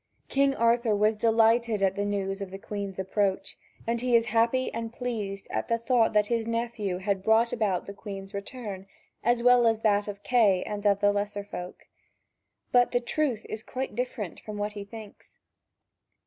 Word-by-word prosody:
King 275 Hz, 0 st, +2 dB
Arthur 230 Hz, -2 st, +3 dB
was 210 Hz, +2 st, +3 dB
delighted 225 Hz, -1 st, +3 dB
at 190 Hz, -1 st, +3 dB
the 205 Hz, 0 st, -1 dB
news 195 Hz, -1 st, -2 dB
of 195 Hz, -, -4 dB
the 195 Hz, -, -7 dB
Queen's 200 Hz, -1 st, -5 dB
approach, 190 Hz, 0 st, -1 dB, 0.3 s
and 230 Hz, 0 st, -1 dB
he 250 Hz, -1 st, +2 dB
is 230 Hz, 0 st, +4 dB
happy 235 Hz, +3 st, +2 dB
and 230 Hz, 0 st, -4 dB
pleased 215 Hz, -6 st, -4 dB
at -, -, -2 dB
the 230 Hz, -, +1 dB
thought 230 Hz, -1 st, +2 dB
that 210 Hz, -1 st, +4 dB
his 230 Hz, 0 st, -1 dB
nephew 230 Hz, -5 st, -2 dB
had 190 Hz, 0 st, -1 dB
brought 220 Hz, +3 st, +3 dB
about 205 Hz, -6 st, 0 dB
the 200 Hz, -, -7 dB
Queen's 195 Hz, -1 st, -8 dB
return, 200 Hz, -2 st, -6 dB, 0.4 s
as 240 Hz, 0 st, +2 dB
well 245 Hz, -1 st, +6 dB
as 225 Hz, -1 st, +1 dB
that 205 Hz, -2 st, +2 dB
of 205 Hz, 0 st, -7 dB
Kay 210 Hz, -7 st, +3 dB
and 210 Hz, 0 st, -2 dB
of 200 Hz, 0 st, +3 dB
the 205 Hz, 0 st, +4 dB
lesser 205 Hz, 0 st, -2 dB
folk. 180 Hz, -3 st, -8 dB, 0.9 s
But 245 Hz, 0 st, +4 dB
the 245 Hz, -, +3 dB
truth 245 Hz, -2 st, -1 dB
is 215 Hz, -, -5 dB
quite 255 Hz, +3 st, -5 dB
different 240 Hz, -7 st, -4 dB
from 215 Hz, -1 st, -8 dB
what 205 Hz, 0 st, -2 dB
he 205 Hz, -1 st, -6 dB
thinks. 215 Hz, 0 st, -12 dB
215 Hz, 185 wpm, -27 LUFS, 200-235 Hz, 0.9 s, well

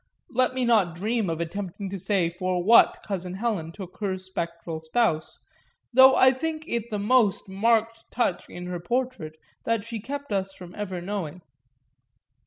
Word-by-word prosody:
Let 255 Hz, 0 st, +2 dB
me 255 Hz, -1 st, 0 dB
not 205 Hz, -8 st, +3 dB
dream 215 Hz, +2 st, -1 dB
of 165 Hz, -1 st, -2 dB
attempting 195 Hz, +3 st, -4 dB
to 195 Hz, -, -4 dB
say 190 Hz, -2 st, +1 dB
for 180 Hz, 0 st, -1 dB
what 230 Hz, +5 st, +6 dB
cousin 185 Hz, -3 st, -4 dB
Helen 195 Hz, -7 st, -2 dB
took 185 Hz, 0 st, -10 dB
her 195 Hz, -3 st, -1 dB
spectral 170 Hz, -3 st, -5 dB
spouse, 160 Hz, 0 st, 0 dB, 0.6 s
though 260 Hz, +1 st, +8 dB
I 260 Hz, -, +7 dB
think 310 Hz, +4 st, -3 dB
it 235 Hz, 0 st, -2 dB
the 210 Hz, -, -2 dB
most 210 Hz, -1 st, +2 dB
marked 225 Hz, +3 st, +1 dB
touch 225 Hz, -7 st, -1 dB
in 180 Hz, -, -7 dB
her 180 Hz, -1 st, -4 dB
portrait 235 Hz, -5 st, -2 dB, 0.3 s
that 230 Hz, -2 st, 0 dB
she 230 Hz, -1 st, -5 dB
kept 280 Hz, +2 st, -5 dB
us 195 Hz, -1 st, -1 dB
from 180 Hz, -2 st, -11 dB
ever 190 Hz, -3 st, -4 dB
knowing. 180 Hz, -3 st, -4 dB
200 Hz, 165 wpm, -26 LUFS, 180-235 Hz, 0.6 s, though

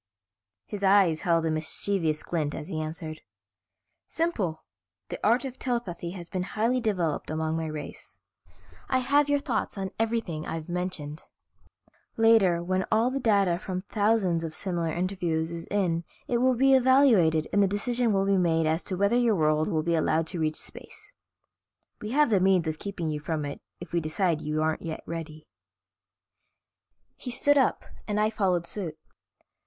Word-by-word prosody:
His 205 Hz, -1 st, -6 dB
eyes 190 Hz, -5 st, +4 dB
held 165 Hz, -2 st, +2 dB
a 160 Hz, -, +1 dB
mischievous 155 Hz, 0 st, -1 dB
glint 155 Hz, -4 st, -2 dB
as 150 Hz, -, -7 dB
he 155 Hz, -, -3 dB
answered. 155 Hz, 0 st, -6 dB, 0.9 s
"Simple, 220 Hz, -, -2 dB, 0.5 s
the -, -, -5 dB
art 235 Hz, +6 st, +3 dB
of 260 Hz, -1 st, -7 dB
telepathy 220 Hz, -9 st, -3 dB
has 175 Hz, -1 st, -8 dB
been 185 Hz, -, -3 dB
highly 230 Hz, +7 st, 0 dB
developed 180 Hz, -9 st, -1 dB
among 160 Hz, 0 st, -1 dB
my 160 Hz, 0 st, -2 dB
race. 155 Hz, -1 st, -8 dB, 0.7 s
I 260 Hz, -, +3 dB
have 285 Hz, +3 st, +2 dB
your 285 Hz, -, +4 dB
thoughts 255 Hz, -8 st, -2 dB
on 190 Hz, -1 st, -3 dB
everything 225 Hz, -9 st, -1 dB
I've 160 Hz, -1 st, -5 dB
mentioned. 175 Hz, -4 st, -4 dB, 1.0 s
Later, 215 Hz, -7 st, +4 dB
when 185 Hz, +1 st, 0 dB
all 225 Hz, +3 st, +3 dB
the 275 Hz, -, -2 dB
data 200 Hz, -7 st, +2 dB
from 185 Hz, -1 st, -4 dB
thousands 205 Hz, -6 st, +1 dB
of 160 Hz, -1 st, -5 dB
similar 170 Hz, -4 st, -2 dB
interviews 170 Hz, -2 st, -1 dB
is 170 Hz, -1 st, -7 dB
in 175 Hz, -5 st, 0 dB, 0.2 s
it 240 Hz, -, +1 dB
will 255 Hz, +1 st, +3 dB
be 270 Hz, +2 st, +4 dB
evaluated 245 Hz, -, +4 dB
and 205 Hz, -, +4 dB
the 200 Hz, -, +4 dB
decision 235 Hz, +4 st, +1 dB, 0.3 s
made 165 Hz, -2 st, +2 dB
as 160 Hz, +2 st, 0 dB
to 185 Hz, -, -3 dB
whether 200 Hz, +4 st, +2 dB
your 240 Hz, -3 st, +3 dB
world 155 Hz, -1 st, +2 dB
will 160 Hz, -5 st, 0 dB
be 170 Hz, +1 st, 0 dB
allowed 160 Hz, 0 st, +1 dB
to 180 Hz, -, -4 dB
reach 155 Hz, -1 st, -1 dB
space. -, -, -10 dB, 0.9 s
We 210 Hz, -, -5 dB
have 290 Hz, +1 st, +3 dB
the 200 Hz, -, +4 dB
means 185 Hz, -3 st, +3 dB
of 155 Hz, 0 st, -3 dB
keeping 175 Hz, -6 st, -4 dB
you 150 Hz, -, -3 dB
from 150 Hz, 0 st, -3 dB
it 140 Hz, -, -6 dB, 0.2 s
if 175 Hz, -, -10 dB
we 170 Hz, -, +3 dB
decide 160 Hz, 0 st, 0 dB
you 155 Hz, 0 st, -1 dB
aren't 160 Hz, 0 st, 0 dB
yet 160 Hz, -1 st, -6 dB
ready." 160 Hz, -2 st, -7 dB, 1.7 s
He -, -, -7 dB
stood 290 Hz, +4 st, +3 dB
up 265 Hz, -, +1 dB, 0.2 s
and 210 Hz, -1 st, 0 dB
I 215 Hz, +1 st, +2 dB
followed 185 Hz, -5 st, 0 dB
suit. 170 Hz, -4 st, -6 dB
180 Hz, 170 wpm, -27 LUFS, 160-220 Hz, 1.7 s, eyes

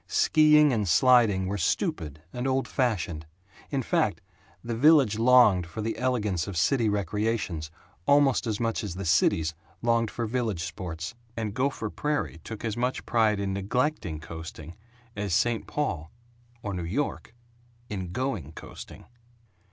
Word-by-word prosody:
Skiing 150 Hz, -2 st, +5 dB
and 105 Hz, -4 st, 0 dB
sliding 115 Hz, -2 st, +4 dB
were 100 Hz, +2 st, -3 dB
"stupid" 75 Hz, -2 st, -1 dB
and 125 Hz, +1 st, -2 dB
"old 135 Hz, 0 st, 0 dB
fashioned." 90 Hz, -, -1 dB, 0.4 s
In 135 Hz, -2 st, -1 dB
fact, -, -, +1 dB, 0.4 s
the 120 Hz, -, -3 dB
village 135 Hz, -5 st, +5 dB
longed 115 Hz, -7 st, +5 dB
for 85 Hz, +6 st, -6 dB
the 115 Hz, -, -2 dB
elegance 105 Hz, -10 st, 0 dB
of 100 Hz, -4 st, -5 dB
city 115 Hz, +4 st, +2 dB
recreations 105 Hz, -5 st, -1 dB, 0.4 s
almost 140 Hz, -3 st, +4 dB
as 110 Hz, -2 st, -1 dB
much 115 Hz, -1 st, -1 dB
as 95 Hz, -5 st, -5 dB
the 95 Hz, +1 st, -5 dB
cities 80 Hz, -1 st, +2 dB, 0.3 s
longed 115 Hz, -1 st, +2 dB
for 115 Hz, -, -3 dB
village 110 Hz, -7 st, -2 dB
sports; 80 Hz, +2 st, -5 dB, 0.2 s
and 110 Hz, -3 st, -3 dB
Gopher 130 Hz, -3 st, -1 dB
Prairie 145 Hz, -, -2 dB
took 110 Hz, +1 st, -7 dB
as 110 Hz, -2 st, -2 dB
much 125 Hz, +2 st, -2 dB
pride 110 Hz, -3 st, +2 dB
in 100 Hz, -1 st, -2 dB
neglecting 100 Hz, -, -1 dB
coasting 80 Hz, 0 st, -9 dB, 0.4 s
as 100 Hz, -4 st, -1 dB
St. 120 Hz, +2 st, +1 dB
Paul 85 Hz, -, -3 dB, 0.5 s
or 100 Hz, -, -3 dB
New 90 Hz, -, -3 dB
York 115 Hz, +5 st, -3 dB, 0.5 s
in 95 Hz, -5 st, -5 dB
going 100 Hz, -, -3 dB
coasting. -, -, -11 dB
110 Hz, 145 wpm, -27 LUFS, 90-125 Hz, 0.5 s, Skiing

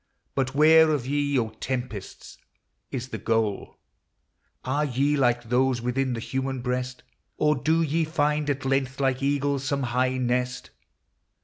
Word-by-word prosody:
But 135 Hz, -1 st, -1 dB
where 160 Hz, +2 st, +7 dB
of 145 Hz, -6 st, 0 dB
ye, 145 Hz, 0 st, 0 dB
O 115 Hz, -3 st, 0 dB
tempests! 120 Hz, -2 st, -6 dB, 0.5 s
is 130 Hz, 0 st, -5 dB
the -, -, -5 dB
goal? 110 Hz, -3 st, -1 dB, 0.9 s
Are 140 Hz, +3 st, 0 dB
ye 140 Hz, +2 st, +1 dB
like 120 Hz, -3 st, +2 dB
those 125 Hz, +2 st, +1 dB
within 125 Hz, +2 st, -1 dB
the 115 Hz, -, -3 dB
human 130 Hz, +1 st, -3 dB
breast? 125 Hz, 0 st, -3 dB, 0.3 s
Or 150 Hz, 0 st, +3 dB
do 160 Hz, +4 st, +1 dB
ye 160 Hz, +2 st, +1 dB
find, 150 Hz, -2 st, 0 dB
at 140 Hz, -1 st, -2 dB
length, 135 Hz, 0 st, 0 dB
like 135 Hz, -1 st, +1 dB
eagles, 140 Hz, 0 st, 0 dB
some 140 Hz, 0 st, -1 dB
high 130 Hz, +1 st, +1 dB
nest 125 Hz, 0 st, -1 dB
130 Hz, 145 wpm, -26 LUFS, 125-145 Hz, 0.9 s, where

